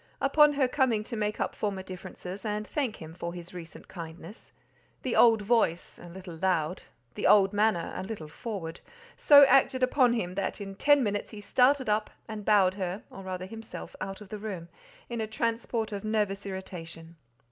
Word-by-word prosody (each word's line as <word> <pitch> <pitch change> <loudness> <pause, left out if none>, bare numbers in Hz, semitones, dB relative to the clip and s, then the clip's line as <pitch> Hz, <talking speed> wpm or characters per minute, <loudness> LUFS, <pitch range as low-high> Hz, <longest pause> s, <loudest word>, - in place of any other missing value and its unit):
Upon 295 +2 +5
her 280 -2 +2
coming 250 -5 +1
to 235 - -6
make 210 -1 -2
up - - -1
former 200 -3 -3
differences, 185 +1 -8
and 210 -1 -2
thank 255 -2 -2
him 160 0 -10
for 170 0 -6
his 175 +1 -9
recent 170 -2 -10
kindness, 170 +3 -10 0.5
the 255 - -1
old 225 -3 +6
voice—a 180 -6 0
little 180 -1 -9
loud—the 160 -9 -2
old 195 -1 +6
manner—a 205 -5 +1
little 190 -5 -6
forward—so 240 - +2
acted 265 -1 +4
upon 255 -1 +4
him 185 -7 -2
that 195 +3 -2
in 195 -1 -6
ten 290 +7 +4
minutes 205 -2 -2
he 215 - -9
started 255 +6 +3
up 210 0 +1 0.2
and 215 -2 -6
bowed 200 -4 +4
her, 190 0 -4
or 195 - -9
rather 185 -1 -5
himself, 225 +3 -9
out 195 +1 -5
of 205 - -11
the 215 - -6
room, 190 -5 -6 0.4
in 235 -1 -3
a 220 - -2
transport 230 0 -2
of 200 -1 -5
nervous 210 -2 -1
irritation. 170 -3 -8
205 Hz, 170 wpm, -29 LUFS, 185-230 Hz, 0.5 s, old